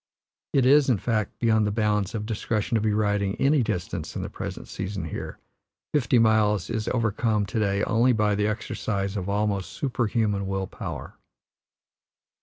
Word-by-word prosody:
It 135 -3 +4
is, 140 +1 +5
in 120 - +4
fact, 110 0 -1
beyond 110 -2 +2
the - - 0
bounds 105 -1 0
of 105 -1 -3
discretion 110 +1 -2
to 110 - +3
be 110 0 +1
riding 105 -1 +1
any 140 +3 +3
distance 90 -7 -3
in - - -3
the - - -5
present - - -6
season 95 -2 -4
here; 80 - -6 0.6
fifty 125 -5 +3
miles 110 -4 +3
is 110 -1 -2
overcome 110 -2 +1
to 110 - -2
day 100 -1 +1
only 115 +3 +3
by 105 -3 +2
the 105 +1 +1
exercise 100 -2 -2
of 100 -1 -3
almost 100 -2 0
superhuman 110 -6 0
will 95 0 -1
power. - - -7
105 Hz, 165 wpm, -26 LUFS, 100-115 Hz, 0.6 s, is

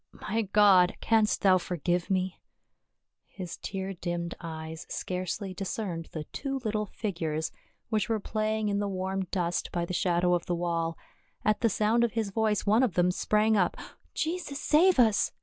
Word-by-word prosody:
" - - -58 0.2
My 225 +3 +1
God! 195 -4 +6
Canst 220 -2 +2
thou 185 -2 +6
forgive 175 0 -1
me 185 -1 -1 0.4
?" - - -57
His 180 -3 -5
tear 195 0 -4
dimmed 175 -1 -3
eyes 160 -1 -7
scarcely 185 +2 -3
discerned 185 -3 -4
the 155 - -4
two 275 -1 -2
little 215 -1 -1
figures 165 -7 -3 0.4
which 215 -1 0
were 225 -1 +1
playing 215 +1 -1
in 200 0 0
the 205 - 0
warm 190 0 -2
dust 175 -2 -2
by 175 -1 -1
the 185 - -5
shadow 180 0 +2
of 175 -1 0
the 175 - 0
wall. 170 -1 -1 0.5
At 215 0 +2
the 230 - +4
sound 220 +4 +2
of 235 - +1
his 220 -3 -1
voice 215 -1 +1
one 215 +4 +4
of 245 -9 +1
them 180 0 +3
sprang 215 +4 +2
up. 180 -4 +2 0.4
"Jesus 320 -3 -2
save 350 +5 +4
us 220 -5 +4
195 Hz, 175 wpm, -29 LUFS, 175-215 Hz, 0.5 s, God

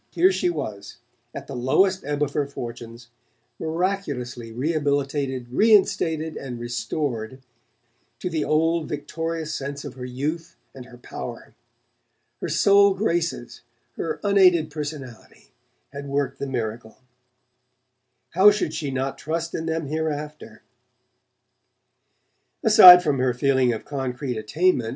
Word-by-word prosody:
Here 180 +2 +3
she 185 -1 0
was, 110 -11 -6 0.3
at - - -8
the - - -9
lowest 185 +10 +2
ebb 145 +1 -1
of 145 -1 -3
her 145 -2 -1
fortunes, 120 -3 -9 0.5
miraculously 160 -9 -3
rehabilitated, 140 -2 -1
reinstated, 160 - +2
and 125 -3 -7
restored 120 0 -4 0.8
to - - -5
the 160 -4 -1
old 165 +1 +1
victorious 160 +1 -4
sense 140 +1 -5
of 140 - -7
her 130 -1 -9
youth 150 +7 -4 0.2
and 130 -2 -10
her 125 -1 -14
power! 120 - -9 0.9
Her - - -3
sole 200 -1 +4
graces, 175 -4 -2 0.3
her 460 - -4
unaided 185 -5 +4
personality, 145 -5 -8 0.4
had 140 0 -7
worked 140 -1 -2
the 140 - -3
miracle; 115 -3 -5 1.3
how 190 +4 +7
should 205 -7 -1
she 150 -3 -3
not 135 0 -3
trust 165 +1 -3
in 160 - -4
them 160 -1 -2
hereafter? 150 0 -5 2.0
Aside 185 -6 +10
from 145 -5 0
her 125 -1 +1
feeling 130 -1 +2
of 110 - -5
concrete 130 -2 -4
attainment. 120 +3 0
145 Hz, 125 wpm, -23 LUFS, 130-165 Hz, 2.0 s, Aside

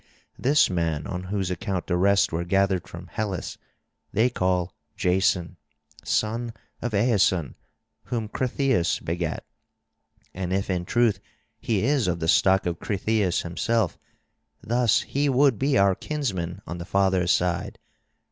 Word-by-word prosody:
This 145 +4 +4
man 80 -4 -1
on 90 -1 -5
whose 95 -1 -2
account 95 -2 -3
the 90 - 0
rest 100 +2 +3
were 85 +1 -1
gathered 95 0 +1
from 85 0 -9
Hellas, 100 -1 -4 0.5
they 115 +4 +2
call 90 -4 0 0.2
Jason, 90 -2 +1 0.5
son 115 +2 -1 0.3
of 120 -3 -2
Aeson, 100 - +2 0.5
whom 115 -3 -3
Cretheus 125 -5 0
begat. 85 -1 -3 0.9
And 90 -1 -4
if 95 +1 0
in 90 -1 -1
truth 115 -1 +2 0.4
he 110 -4 0
is 135 -3 +2
of 85 -1 -1
the 80 - -2
stock 95 +3 +4
of 85 -1 -2
Cretheus 100 -2 0
himself, 100 +3 -1 0.6
thus 120 -1 +2
he 145 +1 -1
would 135 -3 +3
be 135 0 +2
our 100 -1 +4
kinsman 95 - -3
on 85 - -6
the 85 - -6
father's 95 -2 +2
side. 90 -1 0
95 Hz, 140 wpm, -25 LUFS, 90-115 Hz, 0.9 s, This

